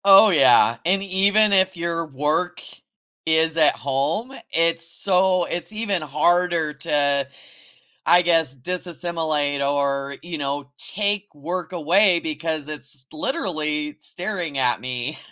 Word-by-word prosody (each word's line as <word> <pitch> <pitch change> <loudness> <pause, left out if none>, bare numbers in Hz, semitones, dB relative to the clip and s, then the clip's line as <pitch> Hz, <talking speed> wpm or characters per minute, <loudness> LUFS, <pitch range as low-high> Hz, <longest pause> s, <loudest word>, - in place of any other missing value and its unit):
Oh, 200 +2 +8
yeah, 130 -6 +5
and 195 +3 +1
even 200 +2 +3
if 190 -1 +3
your 165 -1 -2
work 155 +5 -2 0.6
is 160 0 +2
at 155 - +4
home, 145 - -2 0.2
it's 165 0 +1
so 185 0 +2
it's 175 +4 -4
even 210 -5 -2
harder 160 +2 0
to, 140 -1 +1 0.8
I 175 +1 +5
guess, 165 -5 +1
disassimilate 155 -2 -2
or, 140 -1 -1
you 170 -1 -7
know, 140 0 -4
take 205 0 0
work 170 +4 -5
away 175 +3 +3
because 155 -1 -4
it's 140 -3 -8
literally 155 - -2
staring 175 -2 -4
at 125 -2 +2
me, 125 +3 -4
165 Hz, 120 wpm, -21 LUFS, 145-180 Hz, 0.8 s, Oh